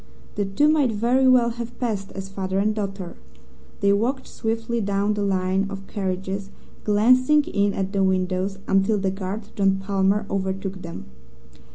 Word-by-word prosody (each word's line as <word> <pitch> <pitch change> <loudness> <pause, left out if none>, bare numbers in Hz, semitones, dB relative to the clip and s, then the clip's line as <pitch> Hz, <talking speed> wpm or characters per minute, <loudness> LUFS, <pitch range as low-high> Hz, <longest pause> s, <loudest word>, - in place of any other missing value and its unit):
The 205 - -1
two 195 +10 +2
might 300 -5 +3
very 240 +5 +2
well 250 -2 +5
have 235 +1 -7
passed 210 -6 -2
as 195 0 -6
father 190 -1 -3
and 210 +2 +2
daughter. 195 -4 -5 0.6
They 200 0 +4
walked 255 +6 0
swiftly 225 +1 -2
down 200 +1 +1
the 210 - -2
line 190 0 +1
of 195 -1 -7
carriages, 195 0 -3 0.3
glancing 255 +8 +4
in 200 -5 0
at 195 +1 -2
the 195 -1 +2
windows, 185 +1 0
until 195 +2 +3
the 195 -1 0
guard, 195 +2 -4
John 195 -1 +3
Palmer, 195 +1 +1
overtook 190 0 -3
them. 170 -1 -7
200 Hz, 160 wpm, -23 LUFS, 195-220 Hz, 0.6 s, well